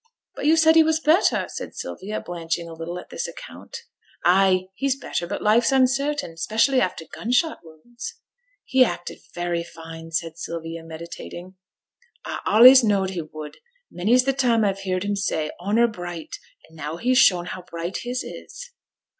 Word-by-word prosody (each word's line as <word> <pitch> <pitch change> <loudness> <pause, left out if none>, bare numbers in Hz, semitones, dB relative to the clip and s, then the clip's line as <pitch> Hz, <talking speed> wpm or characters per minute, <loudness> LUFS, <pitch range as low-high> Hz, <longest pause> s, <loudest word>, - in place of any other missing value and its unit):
'But - - -2
you 320 +1 +5
said 320 0 +5
he 325 - +8
was 315 0 +1
better,' 320 +4 +3
said - - -7
Sylvia, 210 +3 -5
blanching 170 -1 -4
a 165 - -9
little 165 +2 -6
at 180 - -10
this - - -3
account. 475 -1 -10 0.4
'Ay, 185 0 +4
he's 270 +5 0
better, 175 -9 -4
but - - -4
life's 230 +4 +4
uncertain, 270 - +1
special 225 +9 +2
after 180 -5 -2
gun 225 +8 -6
shot 310 +6 +2
wounds.' 170 +10 -10 0.5
'He 260 0 +5
acted 175 -7 -4 0.2
very 175 -1 -1
fine,' 165 -1 -10
said 165 0 -3
Sylvia, 165 0 -6
meditating. 170 +2 -9 0.7
'A - - -4
allays 250 +4 +9
knowed 195 -3 +1
he 180 -3 -3
would. 155 -1 -9 0.3
Many's 230 +8 +3
the 270 +1 +1
time 245 -4 +2
a've 195 -1 0
heerd 185 -1 -2
him 205 0 -1
say 160 -6 -1
"honour 210 +6 +3
bright," 175 -6 -7 0.3
and 160 - -20
now 155 +1 -5
he's 250 +6 +2
shown 175 -7 +5
how 185 +1 -6
bright 170 +1 -5
his 250 +1 -3
is.' - - -10
190 Hz, 170 wpm, -23 LUFS, 170-250 Hz, 0.7 s, allays